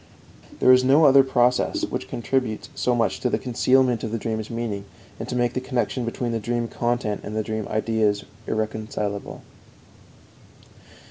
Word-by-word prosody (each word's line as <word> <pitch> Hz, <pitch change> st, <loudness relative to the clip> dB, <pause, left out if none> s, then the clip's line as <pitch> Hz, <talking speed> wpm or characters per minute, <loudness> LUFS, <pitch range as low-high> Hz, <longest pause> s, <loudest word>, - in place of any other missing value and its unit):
There 130 Hz, -, +6 dB
is 130 Hz, 0 st, +5 dB
no 140 Hz, +5 st, +5 dB
other 135 Hz, -1 st, +7 dB
process 125 Hz, -1 st, +1 dB
which -, -, -5 dB
contributes 120 Hz, -2 st, -2 dB
so 125 Hz, -, 0 dB
much 115 Hz, -1 st, 0 dB
to 125 Hz, -, 0 dB
concealment 125 Hz, -1 st, +2 dB
of 110 Hz, -, -3 dB
the 115 Hz, -, -1 dB
dream's 110 Hz, -1 st, -3 dB
meaning 115 Hz, -4 st, -4 dB, 0.3 s
and -, -, -6 dB
to -, -, -3 dB
make 120 Hz, 0 st, +1 dB
the 130 Hz, -, -2 dB
connection 125 Hz, -1 st, -1 dB
between 120 Hz, +1 st, -3 dB
the 115 Hz, -, -1 dB
dream 120 Hz, +2 st, -2 dB
content 120 Hz, -3 st, -1 dB
and 110 Hz, 0 st, -3 dB
dream 110 Hz, -1 st, -3 dB
ideas 110 Hz, -2 st, 0 dB, 0.2 s
irrecognizable. 110 Hz, -2 st, -3 dB
115 Hz, 150 wpm, -24 LUFS, 110-125 Hz, 0.3 s, other